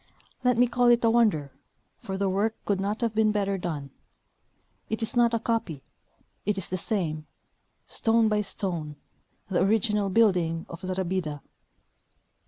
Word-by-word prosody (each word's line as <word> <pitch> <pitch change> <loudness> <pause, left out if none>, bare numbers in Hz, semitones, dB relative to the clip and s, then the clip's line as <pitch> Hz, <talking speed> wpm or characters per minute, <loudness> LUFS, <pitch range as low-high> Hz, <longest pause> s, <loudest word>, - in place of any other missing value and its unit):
Let 250 -2 +3
me 245 - +6
call 245 0 +2
it 240 0 +5
a 225 - +5
wonder, 205 - +2 0.5
for 190 0 -5
the 200 0 0
work 205 +4 0
could 200 -2 0
not 205 +4 -2
have 230 -2 0
been 215 -1 +3
better 200 -2 0
done. 150 -6 -4 1.0
It 220 +1 -2
is 225 - -2
not 235 -1 +4
a - - 0
copy; 220 - -2 0.6
it 205 0 0
is 195 - -3
the 185 - -2
same, 160 -6 -2 0.6
stone 225 0 +2
by 210 -1 +2
stone, 170 -7 -4 0.5
the 185 - +1
original 210 0 +2
building 180 -6 +2
of 170 - -9
La 185 0 -2
Rabida. 175 -6 -2
200 Hz, 160 wpm, -27 LUFS, 175-225 Hz, 1.0 s, me